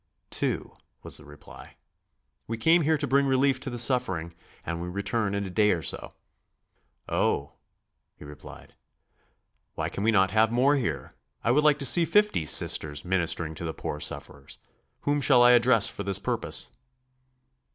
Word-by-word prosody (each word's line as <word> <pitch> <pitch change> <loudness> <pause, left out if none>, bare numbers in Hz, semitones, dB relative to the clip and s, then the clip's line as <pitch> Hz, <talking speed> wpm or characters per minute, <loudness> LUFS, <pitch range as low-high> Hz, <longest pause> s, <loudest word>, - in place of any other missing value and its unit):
"Two," - - -3 0.3
was - - -4
the 80 - -15
reply. 75 0 -14 0.7
"We 115 - -4
came 165 +8 +3
here 160 +1 +1
to 145 - -2
bring 140 +1 +2
relief 135 0 +2
to - - -5
the 120 - -6
suffering, 110 -9 0 0.3
and 85 0 -4
we 90 - -5
return 100 +2 -2
in 100 0 -2
a 95 - -7
day 105 +2 +2
or 85 -5 0
so." - - -3 1.0
"Oh," - - -1 0.6
he - - -14
replied, 75 0 -13 1.0
"why - - -3
can 100 - -5
we 110 - +2
not 95 -4 +3
have 110 +1 +2
more 130 +5 +3
here? 80 - -3 0.3
I 120 - +2
would 150 +4 +2
like 150 -1 +4
to 140 - -4
see 165 +7 +4
fifty 205 - +1
Sisters 75 +1 0
ministering 85 -3 0
to 80 - -9
the 80 -1 -5
poor 75 - -5
sufferers. - - -4 0.4
Whom 145 0 0
shall 125 -3 +5
I 120 - +7
address 120 -3 +5
for - - -6
this 100 -1 +2
purpose?" - - -3
110 Hz, 170 wpm, -26 LUFS, 85-135 Hz, 1.0 s, I